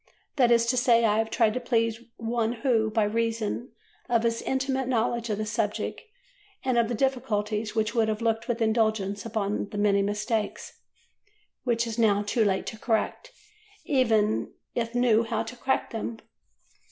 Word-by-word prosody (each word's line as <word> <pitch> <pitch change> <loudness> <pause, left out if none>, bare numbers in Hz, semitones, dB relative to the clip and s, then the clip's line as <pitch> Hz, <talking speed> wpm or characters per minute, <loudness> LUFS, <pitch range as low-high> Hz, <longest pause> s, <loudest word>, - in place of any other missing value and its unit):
That 250 -3 +5
is 235 -1 +4
to 250 +2 +1
say, 235 -2 +4
I 215 0 +3
have 225 0 0
tried 225 -1 +2
to 255 - -1
please 230 -2 0 0.2
one 230 0 -1
who, 225 -5 +2
by 215 0 +1
reason 230 +2 -1 0.4
of 235 -1 +2
his 230 0 0
intimate 265 -1 -1
knowledge 235 -1 0
of 210 - -1
the 215 - -2
subject 210 -1 -2 0.6
and 255 -2 +2
of 230 - +2
the 240 - -2
difficulties, 220 -4 -1
would 215 -1 +1 0.2
have 215 -1 -1
looked 225 -1 0
with 235 -1 0
indulgence 220 -2 0
upon 210 -2 -2
the 205 - -6
many 205 -1 +3
mistakes 210 +2 -2 0.9
which 235 -1 +1
it - - -4
is 220 - -6
now 205 -2 +3
too 220 +2 +1
late 195 -2 +1
to 220 - -6
correct, 240 - -1 0.5
even 225 -6 +2 0.2
if 230 0 -2
knew 240 -3 +4
how 225 -1 -1
to 250 - -8
correct 265 +2 -1
them. 225 0 -4
225 Hz, 170 wpm, -27 LUFS, 215-240 Hz, 0.9 s, That